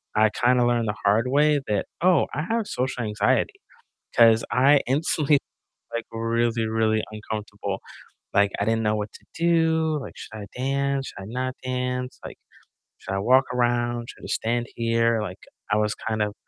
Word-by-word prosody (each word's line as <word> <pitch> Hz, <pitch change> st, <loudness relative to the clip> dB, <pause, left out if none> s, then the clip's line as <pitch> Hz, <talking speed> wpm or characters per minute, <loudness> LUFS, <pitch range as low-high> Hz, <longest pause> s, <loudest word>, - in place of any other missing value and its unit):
I 110 Hz, 0 st, +5 dB
kinda 125 Hz, 0 st, +3 dB
learned 120 Hz, -2 st, +1 dB
the 105 Hz, -, -1 dB
hard 105 Hz, +4 st, +3 dB
way 145 Hz, +1 st, +4 dB
that, 105 Hz, -2 st, 0 dB, 0.2 s
"Oh, 180 Hz, -1 st, +4 dB
I 150 Hz, -, -2 dB
have 225 Hz, +3 st, -1 dB
social 125 Hz, -1 st, -2 dB
anxiety," 110 Hz, -, +1 dB, 0.6 s
'cause 115 Hz, -2 st, +6 dB
I 140 Hz, +3 st, +5 dB
instantly 145 Hz, +1 st, +2 dB, 0.5 s
like, 115 Hz, -, -2 dB
really, 115 Hz, 0 st, 0 dB
really 110 Hz, -1 st, +1 dB
uncomfortable, 105 Hz, -2 st, -5 dB, 0.5 s
like, 100 Hz, 0 st, +4 dB
I 100 Hz, -, +1 dB
didn't 115 Hz, 0 st, +1 dB
know 105 Hz, 0 st, +2 dB
what 105 Hz, 0 st, -4 dB
to -, -, -15 dB
do, 160 Hz, -2 st, +2 dB
like, -, -, -7 dB
"Should -, -, -10 dB
I 105 Hz, -2 st, -6 dB
dance? 135 Hz, +1 st, -1 dB
Should -, -, -9 dB
I -, -, -8 dB
not 130 Hz, +4 st, -3 dB
dance? 125 Hz, 0 st, -3 dB
Like, -, -, -8 dB, 0.6 s
should -, -, -5 dB
I -, -, 0 dB
walk 130 Hz, +6 st, +4 dB
around? 120 Hz, -1 st, 0 dB
Should -, -, -12 dB
I -, -, -6 dB
stand 120 Hz, +1 st, -1 dB
here?" 115 Hz, -1 st, +2 dB
Like, 90 Hz, -2 st, -6 dB, 0.3 s
I 105 Hz, -, +4 dB
was 105 Hz, 0 st, +1 dB
kind 110 Hz, -1 st, -3 dB
of 105 Hz, -1 st, 0 dB
120 Hz, 175 wpm, -24 LUFS, 110-130 Hz, 0.6 s, cause